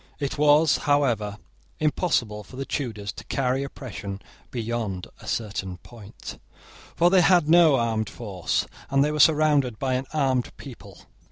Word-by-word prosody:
It 140 Hz, -2 st, -2 dB
was, 150 Hz, +1 st, +4 dB
however, 115 Hz, -8 st, +1 dB, 0.4 s
impossible 135 Hz, -, 0 dB
for 100 Hz, -, -14 dB
the 135 Hz, +1 st, -4 dB
Tudors 110 Hz, -9 st, -4 dB
to 95 Hz, -, -10 dB
carry 130 Hz, +1 st, 0 dB
oppression 110 Hz, -8 st, -7 dB, 0.3 s
beyond 115 Hz, -6 st, -3 dB
a -, -, -13 dB
certain 100 Hz, -5 st, -3 dB
point: 110 Hz, +1 st, -11 dB, 0.6 s
for 175 Hz, +1 st, +4 dB
they 190 Hz, -1 st, +6 dB
had 175 Hz, -2 st, +4 dB
no 165 Hz, -3 st, +6 dB
armed 115 Hz, -3 st, 0 dB
force, 100 Hz, -7 st, -2 dB, 0.2 s
and 135 Hz, +1 st, +3 dB
they 150 Hz, -, 0 dB
were 150 Hz, -, -3 dB
surrounded 145 Hz, -6 st, +4 dB
by 130 Hz, +1 st, -1 dB
an 130 Hz, +1 st, -2 dB
armed 135 Hz, -5 st, 0 dB
people. -, -, -12 dB
130 Hz, 150 wpm, -25 LUFS, 110-150 Hz, 0.6 s, they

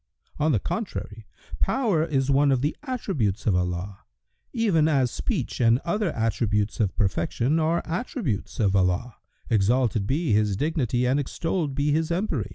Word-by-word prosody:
On 155 Hz, +2 st, +2 dB
the 125 Hz, -, +3 dB
contrary, 110 Hz, -, -5 dB, 0.3 s
power 215 Hz, -12 st, +1 dB
is 140 Hz, -4 st, 0 dB
one 140 Hz, +1 st, +4 dB
of 130 Hz, -2 st, +2 dB
the 150 Hz, -, 0 dB
attributes 170 Hz, -, -2 dB
of 100 Hz, -, +3 dB
Allah, 90 Hz, +2 st, -2 dB, 0.5 s
even 200 Hz, -, +2 dB
as 135 Hz, -6 st, +2 dB
speech -, -, -3 dB
and 115 Hz, 0 st, +5 dB
other 205 Hz, +2 st, 0 dB
attributes 110 Hz, -2 st, 0 dB
of 100 Hz, -5 st, 0 dB
perfection 100 Hz, -, 0 dB
are 165 Hz, +2 st, +1 dB
attributes 170 Hz, -, -3 dB
of 100 Hz, -3 st, +2 dB
Allah 95 Hz, +5 st, 0 dB, 0.3 s
(exalted 110 Hz, 0 st, +2 dB
be 145 Hz, 0 st, +1 dB
His 105 Hz, -2 st, +2 dB
dignity 130 Hz, -, 0 dB
and 130 Hz, +3 st, +2 dB
extolled 155 Hz, +1 st, -2 dB
be 145 Hz, +1 st, +1 dB
His 160 Hz, +2 st, +1 dB
empery!) 170 Hz, -, -1 dB
130 Hz, 155 wpm, -25 LUFS, 105-160 Hz, 0.5 s, and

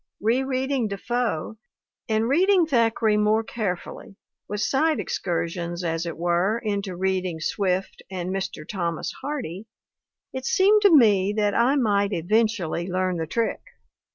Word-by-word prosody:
Re 230 Hz, +5 st, +2 dB
reading 265 Hz, -2 st, -1 dB
Defoe, 220 Hz, -1 st, -2 dB, 0.5 s
and 220 Hz, +1 st, +1 dB
reading 360 Hz, +6 st, +4 dB
Thackeray 225 Hz, -6 st, +2 dB
more 215 Hz, +1 st, +2 dB
carefully, 200 Hz, -3 st, -5 dB, 0.3 s
with 205 Hz, +1 st, -3 dB
side 295 Hz, +10 st, +1 dB
excursions, 170 Hz, 0 st, -3 dB
as 165 Hz, 0 st, -2 dB
it 165 Hz, -, -5 dB
were, 175 Hz, +5 st, +1 dB
into 200 Hz, -4 st, -3 dB
reading 185 Hz, -2 st, -1 dB
Swift 190 Hz, +3 st, -1 dB
and 185 Hz, -1 st, -4 dB
Mr. 190 Hz, -5 st, -4 dB
Thomas 170 Hz, -5 st, -3 dB
Hardy, 235 Hz, -, -5 dB, 0.7 s
it 260 Hz, 0 st, -5 dB
seemed 410 Hz, +6 st, +4 dB
to 405 Hz, -, +6 dB
me 205 Hz, -5 st, +4 dB
that 210 Hz, -1 st, +1 dB
I 250 Hz, +4 st, +3 dB
might 205 Hz, -6 st, +1 dB
eventually 185 Hz, -2 st, 0 dB
learn 185 Hz, -1 st, -1 dB
the 160 Hz, -1 st, -3 dB
trick. 230 Hz, +7 st, -1 dB
205 Hz, 135 wpm, -24 LUFS, 180-235 Hz, 0.7 s, to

